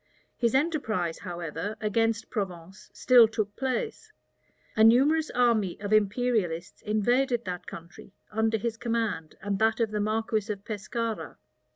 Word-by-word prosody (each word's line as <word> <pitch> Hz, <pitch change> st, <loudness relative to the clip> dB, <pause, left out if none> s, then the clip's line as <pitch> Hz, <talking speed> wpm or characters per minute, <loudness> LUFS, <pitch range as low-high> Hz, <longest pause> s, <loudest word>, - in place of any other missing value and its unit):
His 235 Hz, 0 st, +1 dB
enterprise, 225 Hz, -, 0 dB
however, 175 Hz, +2 st, -5 dB
against 225 Hz, +1 st, 0 dB
Provence 190 Hz, -3 st, -5 dB
still 245 Hz, -3 st, +6 dB
took 215 Hz, -2 st, -3 dB
place. 435 Hz, -, -3 dB, 0.6 s
A 220 Hz, -, +4 dB
numerous 285 Hz, +8 st, +5 dB
army 230 Hz, -6 st, +1 dB
of 205 Hz, +1 st, -2 dB
imperialists 210 Hz, -5 st, 0 dB
invaded 240 Hz, +4 st, +1 dB
that 180 Hz, -1 st, -5 dB
country, 170 Hz, +3 st, -11 dB, 0.2 s
under 220 Hz, +1 st, +1 dB
his 225 Hz, +1 st, -3 dB
command 225 Hz, -9 st, -2 dB
and 200 Hz, -1 st, -1 dB
that 220 Hz, +1 st, +2 dB
of 225 Hz, -2 st, +1 dB
the 210 Hz, -1 st, -1 dB
marquis 215 Hz, 0 st, -1 dB
of 200 Hz, -1 st, -7 dB
Pescara. 225 Hz, +2 st, -4 dB
220 Hz, 135 wpm, -27 LUFS, 200-235 Hz, 0.6 s, still